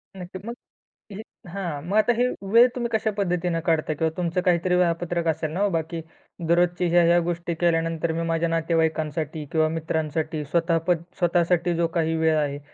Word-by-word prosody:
नक्की. 185 0 -8
मग 235 - -5 0.6
हे 205 +2 -7 0.3
हां, 175 -7 -4
मग 200 - 0
आता 215 +3 +4
हे 250 +1 +3 0.3
वेळ 240 +2 +8
तुम्ही 240 -2 -2
कशा 220 0 +1
पद्धतीने 180 -3 0
काढता? 160 -2 +1
किंवा 160 +2 0
तुमचं 180 +1 -1
काहीतरी 180 0 +2
वेळापत्रक 170 -1 0
असेल 155 -1 -1
ना 180 - -4
हो. 205 - +3
बाकी 165 0 -2 0.5
दररोजची 175 +1 +2
ह्या-ह्या 175 0 +5
गोष्टी 170 0 -3
केल्यानंतर 165 -1 +1
मी 165 - -2
माझ्या 165 0 0
नातेवाईकांसाठी 160 -2 -1
किंवा 155 -1 +2
मित्रांसाठी 160 -1 -2
स्वतःपण, 165 +1 +1 0.2
स्वतःसाठी 175 0 +2
जो 170 0 +1
काही 165 0 +1
वेळ 160 0 +2
आहे. 145 -1 -1
170 Hz, 165 wpm, -24 LUFS, 160-180 Hz, 0.6 s, वेळ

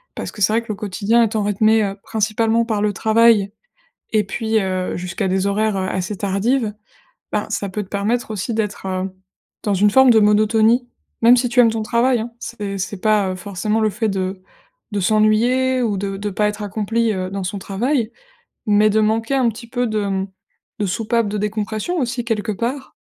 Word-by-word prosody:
Parce - - -5
que 210 - -11
c'est 205 +2 +3
vrai 230 - +2
que 230 - -17
le 215 - -2
quotidien 210 +3 +1
étant 215 -1 0
rythmé, 215 +2 +3
heu, 195 -1 -2
principalement 220 +1 +1
par 215 -3 -1
le 210 -1 +1
travail 220 -2 +3 0.6
et 215 -2 +3
puis, 220 +3 -1
heu, 185 -1 -2
jusqu'à 180 +2 -3
des 190 +1 0
horaires, 210 +1 +1
heu, 190 -1 -1
assez 190 +2 -3
tardives, 210 +4 0 0.6
ben - - -1
ça 200 - -2
peut 205 +2 -4
te - - -20
permettre 215 +5 -1
aussi 215 +3 -3
d'être, 210 -3 -3
heu, 185 0 -2 0.5
dans 205 -2 +1
une 205 +2 +4
forme 265 +3 +6
de 220 -2 +6
monotonie, 220 +3 +3 0.3
même 240 +2 +7
si 245 0 +1
tu 240 +1 -4
aimes 230 -2 +6
ton 220 -1 -2
travail, 235 +2 +2
hein. 230 +1 -6
C'est 205 -4 -5
c'est 195 0 -4
pas, 210 -2 +2
heu, - - -5
forcément 205 +3 -2
le 215 -1 +2
fait 220 +2 -1
de 190 -1 -2 0.5
de 205 - -1
s'ennuyer 225 +6 +2
ou 210 -4 0
de 195 0 -3
de 205 +1 -3
pas 210 +2 +1
être 210 0 -5
accompli, 220 +3 0
heu, 185 -1 -3
dans 195 0 -4
son 190 +2 -3
travail, 230 +5 -1 0.6
mais 210 +1 +4
de 220 +1 +2
manquer 225 +4 +1
un 250 -3 +3
petit 235 +2 -9
peu 245 0 -1
de, 215 -1 -1
mmh, 195 -1 -1 0.5
de 205 - 0
soupape 225 +3 0
de 210 - -3
décompression 215 - -2
aussi 240 -1 -2
quelque 225 -2 -1
part. 250 +6 -4
215 Hz, 205 wpm, -20 LUFS, 200-230 Hz, 0.6 s, même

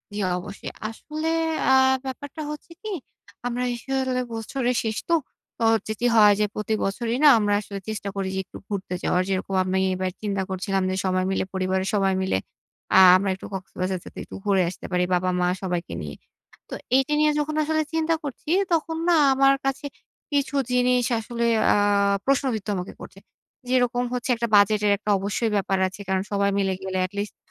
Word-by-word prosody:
জি, - - -3 0.2
অবশ্যই। 200 +2 -8 0.2
আসলে 305 +7 -5 0.4
আ - - +5 0.3
ব্যাপারটা 285 +3 -6
হচ্ছে 300 +3 -9
কি? 435 - -6 0.6
আমরা 245 +1 -2
আসলে 260 +1 -1
বছরের 245 +3 -2
শেষ 220 -1 -2
তো, - - +3 0.4
তো - - -3
হচ্ছে 215 0 -1
কি? 245 - -1
হয় 210 -2 +7
যে 210 - +3
প্রতি 215 +1 -2
বছরই 230 +4 -1
না - - +9
আমরা 205 -1 +1
আসলে 200 -1 -7
চেষ্টা 205 -2 -4
করি 195 -1 -2
যে - - -1
একটু - - -11
ঘুরতে 190 -3 -4
যাওয়ার। 180 - +2
যেইরকম 195 0 -2
আমি 185 +1 0 0.2
এবার 185 0 -2
চিন্তা 200 -2 -1
করছিলাম 190 0 -1
যে 185 - -1
সবাই 185 0 +1
মিলে - - 0
পরিবারের 190 0 -1
সবাই 195 -2 +2
মিলে 190 - +1 0.6
আ - - +8 0.2
আমরা 195 +1 -1
একটু 190 - -11
কক্সবাজার 185 -1 -3
যেতে, - - -13
একটু - - -10
ঘুরে 195 -2 +3
আসতে 180 - -10
পারি 180 0 +2
বাবা-মা 180 0 +1
সবাইকে 180 -2 -3
নিয়ে। 75 -1 -6 0.5
তো - - -7 0.2
এইটা 270 +2 +2
নিয়ে 305 0 +4
যখন 300 +1 -2
আসলে 315 +1 +1
চিন্তা 325 0 +1
করছি, 285 +1 -7 0.2
তখন 325 0 0
না 340 - +5 0.2
আমার 275 +1 +4
কাছে 270 +1 -1 0.5
কিছু 285 -1 0 0.2
জিনিস 250 0 +3
আসলে 235 +1 -3 0.3
আ - - +3 0.5
প্রশ্নবিদ্ধ 255 -6 0
আমাকে 180 0 -5
করছে। - - -11 0.5
যেরকম 245 -1 +2
হচ্ছে 250 +1 -3
একটা 235 0 -2
বাজেটের 205 0 +4
একটা 210 +1 -6
অবশ্যই 205 +3 -1
ব্যাপার 195 -1 +1
আছে। 185 +2 -10
কারণ 190 0 +1
সবাই 200 0 +2
মিলে 195 -1 +1
গেলে 190 0 -3
এট 185 - -8
লিস্ট 205 +1 -3
210 Hz, 180 wpm, -24 LUFS, 190-255 Hz, 0.6 s, না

